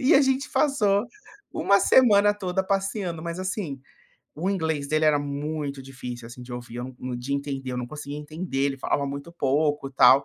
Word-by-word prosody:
e 270 Hz, +5 st, +5 dB
a 275 Hz, -, +8 dB
gente 265 Hz, +1 st, +1 dB
passou 210 Hz, -9 st, +3 dB, 0.5 s
1 200 Hz, 0 st, +4 dB
semana 205 Hz, -3 st, +6 dB
toda 190 Hz, -2 st, -2 dB
passeando. 195 Hz, -3 st, -1 dB
Mas, 170 Hz, +1 st, -4 dB
assim, 185 Hz, -7 st, -3 dB, 0.5 s
o 180 Hz, +6 st, -1 dB
inglês 160 Hz, -6 st, -1 dB
dele 155 Hz, +1 st, +2 dB
era 150 Hz, -1 st, +5 dB
muito 145 Hz, 0 st, -3 dB
difícil, 125 Hz, -3 st, -7 dB
assim, 120 Hz, +1 st, -10 dB
de 125 Hz, 0 st, -9 dB
ouvir. 120 Hz, -1 st, -7 dB
Eu 120 Hz, -, -3 dB
não 130 Hz, 0 st, -5 dB
nã -, -, -2 dB
de 130 Hz, +3 st, -4 dB
entender, 140 Hz, -2 st, -3 dB
eu 125 Hz, -, -2 dB
não 125 Hz, -, -3 dB
conseguia 145 Hz, +2 st, -6 dB
entender, 155 Hz, 0 st, -5 dB
ele 140 Hz, -1 st, -2 dB
falava 140 Hz, +1 st, 0 dB
muito 140 Hz, +4 st, -6 dB
pouco 145 Hz, -2 st, +1 dB
e -, -, -18 dB
tal. 135 Hz, +1 st, +7 dB
150 Hz, 200 wpm, -26 LUFS, 135-190 Hz, 0.5 s, a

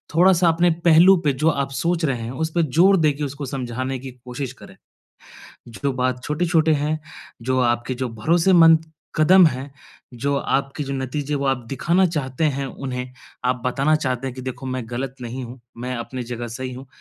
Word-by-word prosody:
थोड़ा-सा 180 Hz, 0 st, +5 dB
अपने 170 Hz, +2 st, +3 dB, 0.2 s
पहलू 170 Hz, +4 st, +7 dB
पे 145 Hz, -, +3 dB
जो 155 Hz, +5 st, +2 dB
आप 140 Hz, -3 st, -1 dB
सोच 165 Hz, +6 st, -1 dB
रहे 135 Hz, -4 st, 0 dB
हैं, 115 Hz, +1 st, -5 dB
उस 160 Hz, +5 st, -2 dB
पे 170 Hz, -, +3 dB
ज़ोर 175 Hz, +7 st, +4 dB
देके 150 Hz, -3 st, +1 dB
उसको 140 Hz, +1 st, -4 dB
समझाने 130 Hz, 0 st, -3 dB
की 130 Hz, 0 st, -8 dB
कोशिश 125 Hz, +1 st, -5 dB
करें। -, -, -15 dB, 0.9 s
जो 135 Hz, +4 st, -3 dB
बात 125 Hz, -1 st, -1 dB
छोटे-छोटे 160 Hz, 0 st, +2 dB
हैं, 150 Hz, +2 st, -1 dB, 0.4 s
जो 130 Hz, +2 st, 0 dB
आपके 120 Hz, +1 st, 0 dB
जो 130 Hz, -, -1 dB
भरोसेमंद 165 Hz, -, +4 dB, 0.3 s
कदम 180 Hz, +4 st, +6 dB
हैं, 135 Hz, -1 st, -2 dB, 0.4 s
जो 140 Hz, +4 st, -1 dB
आपके 140 Hz, +2 st, -1 dB
जो 140 Hz, -, -4 dB
नतीजे 135 Hz, +2 st, -3 dB
वो 140 Hz, -1 st, -1 dB
आप 135 Hz, -2 st, +1 dB
दिखाना 170 Hz, +8 st, +2 dB
चाहते 150 Hz, -3 st, -2 dB
हैं 140 Hz, 0 st, -3 dB
उन्हें, 125 Hz, -1 st, -6 dB, 0.3 s
आप 125 Hz, -1 st, 0 dB
बताना 135 Hz, +4 st, +2 dB
चाहते 130 Hz, -3 st, -2 dB
हैं 130 Hz, -, -4 dB
कि 130 Hz, -, -8 dB
देखो 130 Hz, +1 st, -6 dB
मैं 130 Hz, -1 st, -3 dB
गलत 130 Hz, +2 st, -4 dB
नहीं 125 Hz, +2 st, -5 dB
हूँ, 120 Hz, +1 st, -10 dB, 0.2 s
मैं 125 Hz, +2 st, -4 dB
अपने 125 Hz, +2 st, -5 dB
जगह 120 Hz, 0 st, -5 dB
सही 130 Hz, +2 st, -5 dB
हूँ। 130 Hz, +2 st, -9 dB
135 Hz, 185 wpm, -22 LUFS, 125-155 Hz, 0.9 s, पहलू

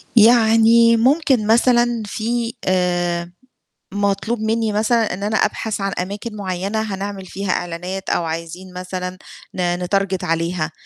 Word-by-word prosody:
يعني 230 Hz, 0 st, +6 dB
ممكن 260 Hz, -2 st, +2 dB
مثلًا 240 Hz, 0 st, +3 dB
في 230 Hz, +3 st, -2 dB
آآ 175 Hz, -1 st, 0 dB, 0.6 s
مطلوب 205 Hz, +3 st, -1 dB
منّي 220 Hz, 0 st, 0 dB
مثلًا 220 Hz, 0 st, +1 dB
إن 190 Hz, +2 st, -6 dB
أنا 210 Hz, +1 st, -1 dB
أبحث 215 Hz, -2 st, -1 dB
عن 195 Hz, -, -1 dB
أماكن 205 Hz, +4 st, -5 dB
معيّنة 195 Hz, +2 st, -2 dB
هنعمل 200 Hz, -2 st, -5 dB
فيها 190 Hz, +1 st, -3 dB
إعلانات 180 Hz, +2 st, -4 dB
أو -, -, +1 dB
عايزين 165 Hz, +3 st, -6 dB
مثلًا 180 Hz, 0 st, -5 dB, 0.4 s
ن 175 Hz, -1 st, 0 dB
نتارجت 195 Hz, 0 st, 0 dB
عليها، 165 Hz, -1 st, -1 dB
200 Hz, 125 wpm, -20 LUFS, 180-225 Hz, 0.6 s, يعني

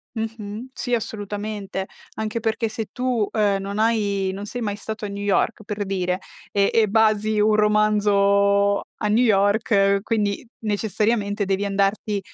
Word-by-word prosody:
Mh-mh. 220 Hz, +1 st, -5 dB
Sì, 245 Hz, -2 st, -3 dB
assolutamente, 205 Hz, -3 st, -4 dB, 0.3 s
anche 220 Hz, +1 st, -2 dB
perché 225 Hz, +1 st, 0 dB
se 220 Hz, 0 st, -5 dB
tu, 250 Hz, -4 st, 0 dB
ehm, 205 Hz, -3 st, +1 dB
non 200 Hz, +1 st, -5 dB
hai 205 Hz, -4 st, +1 dB
non 200 Hz, +2 st, -6 dB
sei 245 Hz, +3 st, -5 dB
mai 205 Hz, -2 st, -2 dB
stato 220 Hz, 0 st, -6 dB
a -, -, -2 dB
New 200 Hz, 0 st, -5 dB
York 205 Hz, +2 st, +1 dB
per 205 Hz, 0 st, -4 dB
dire, 180 Hz, -2 st, -1 dB, 0.3 s
e 200 Hz, -1 st, +2 dB
e 220 Hz, -2 st, +4 dB
basi 215 Hz, 0 st, +2 dB
un 210 Hz, 0 st, +4 dB
romanzo 200 Hz, -1 st, +3 dB, 0.2 s
a 210 Hz, -, +1 dB
New 225 Hz, +4 st, +3 dB
York, 200 Hz, -1 st, +3 dB
quindi 210 Hz, -2 st, -1 dB, 0.2 s
necessariamente 210 Hz, 0 st, 0 dB
devi 195 Hz, +1 st, 0 dB
andarti 200 Hz, +1 st, 0 dB
210 Hz, 150 wpm, -23 LUFS, 200-220 Hz, 0.3 s, e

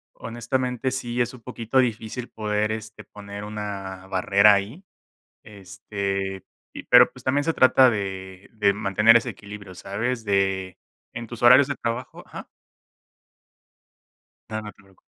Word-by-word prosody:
Honestamente, 125 Hz, +2 st, -3 dB
sí 120 Hz, -1 st, -2 dB
es 120 Hz, -, -1 dB
un 125 Hz, -, -13 dB
poquito 120 Hz, +2 st, -1 dB
difícil 120 Hz, 0 st, -2 dB
poder, 105 Hz, -1 st, -2 dB
este, 110 Hz, -1 st, -7 dB
poner 100 Hz, 0 st, -10 dB
una 100 Hz, -3 st, -6 dB
barrera 100 Hz, +2 st, +4 dB
ahí, 105 Hz, -, -2 dB, 0.6 s
este, 95 Hz, -1 st, -5 dB, 0.3 s
y, -, -, -9 dB
pero, -, -, +7 dB
pues, -, -, -15 dB
también 140 Hz, +2 st, +1 dB
se 165 Hz, -, +1 dB
trata 130 Hz, -2 st, +5 dB
de 95 Hz, -2 st, -6 dB
de 105 Hz, -3 st, +2 dB
mantener 105 Hz, +3 st, +4 dB
ese 120 Hz, +1 st, +1 dB
equilibrio, 100 Hz, -3 st, -11 dB
¿sabes? 110 Hz, +6 st, -3 dB
De, 95 Hz, -2 st, 0 dB, 0.3 s
en 120 Hz, 0 st, -6 dB
tus 120 Hz, +1 st, -10 dB
horarios 125 Hz, +3 st, +7 dB
de 140 Hz, -, -3 dB
trabajo, 120 Hz, +1 st, -5 dB
¿ajá? -, -, -9 dB, 2.0 s
No, 110 Hz, 0 st, -4 dB
no 105 Hz, -, -8 dB
te -, -, -31 dB
preocupes. 95 Hz, 0 st, -23 dB
105 Hz, 145 wpm, -24 LUFS, 100-120 Hz, 2.0 s, pero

